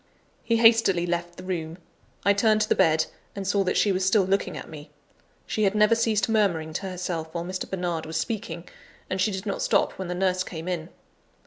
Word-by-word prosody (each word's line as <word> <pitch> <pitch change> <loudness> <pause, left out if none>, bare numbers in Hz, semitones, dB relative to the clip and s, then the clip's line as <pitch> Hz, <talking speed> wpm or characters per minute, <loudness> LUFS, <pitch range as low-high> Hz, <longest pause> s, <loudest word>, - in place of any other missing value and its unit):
He 230 - +2
hastily 225 -6 +5
left 175 0 -3
the 185 - -9
room. 170 -3 -4 0.5
I 200 - +6
turned 215 +1 +3
to 215 - 0
the - - +5
bed, 160 0 +3 0.3
and 195 -1 -4
saw 200 0 +2
that 180 - +1
she 205 - +3
was 185 0 0
still 195 +2 +4
looking 195 +2 0
at - - -8
me. 150 -2 -10 0.6
She 215 - -2
had 200 0 +2
never 210 +1 +5
ceased 225 -2 +1
murmuring 185 -8 +1
to 195 - -3
herself 175 -3 -3
while 170 0 -2
Mr. 185 +1 -4
Bernard 175 -4 -2
was 160 0 -3
speaking; 200 -1 -4 0.4
and 185 0 0
she 190 - +3
did 190 0 -5
not 200 - -2
stop - - +1
when 190 - -3
the 180 - -3
nurse 185 0 +1
came 165 -1 -7
in. 175 -2 -3
185 Hz, 215 wpm, -26 LUFS, 170-205 Hz, 0.6 s, I